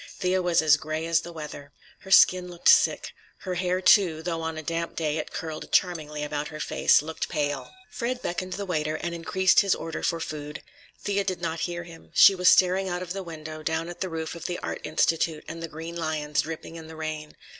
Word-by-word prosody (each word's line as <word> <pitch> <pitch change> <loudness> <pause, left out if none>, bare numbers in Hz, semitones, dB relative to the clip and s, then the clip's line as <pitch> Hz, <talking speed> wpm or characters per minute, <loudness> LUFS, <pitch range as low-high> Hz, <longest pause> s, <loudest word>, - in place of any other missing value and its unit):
Thea 185 0 +1
was 175 -2 +2
as 155 -2 +6
gray 155 +1 -4
as 165 0 +2
the 170 - -9
weather. 150 -3 -9 0.3
Her 190 - -13
skin 185 -1 +6
looked 175 -1 +1
sick. - - +4 0.3
Her 185 - -3
hair, 180 +1 0
too, 175 -5 +4
though 165 -1 -2
on 160 0 -3
a 155 - -5
damp 165 +2 -3
day 155 -1 -1
it - - -5
curled 160 -1 -6
charmingly 155 -5 +1
about 150 0 -3
her 155 0 -8
face, 150 - +3
looked 160 +1 -4
pale. 145 -4 -2 0.2
Fred 245 +1 -2
beckoned 185 -4 -4
the 200 - -4
waiter 155 -4 -1
and 170 +2 -4
increased 185 +3 +3
his 200 -2 +3
order 165 0 -5
for 165 - 0
food. 150 -2 -6 0.4
Thea 200 -1 0
did 185 -2 -2
not 165 -1 -3
hear 175 0 -4
him. 170 -1 -14
She - - +9
was 180 -1 +4
staring 190 +1 +4
out 175 0 -3
of 180 0 -5
the 195 - -4
window, 155 -3 -8
down 160 +2 -2
at 175 - -9
the 190 - -1
roof 160 -1 -4
of 170 - -9
the 175 - -2
Art - - -4
Institute 160 0 0
and 165 +1 -7
the 165 - -4
green 165 +2 -8
lions, 155 -3 -1
dripping 160 +1 -7
in 160 -1 -9
the 160 - -10
rain. 155 -1 -5
165 Hz, 220 wpm, -26 LUFS, 155-180 Hz, 0.4 s, She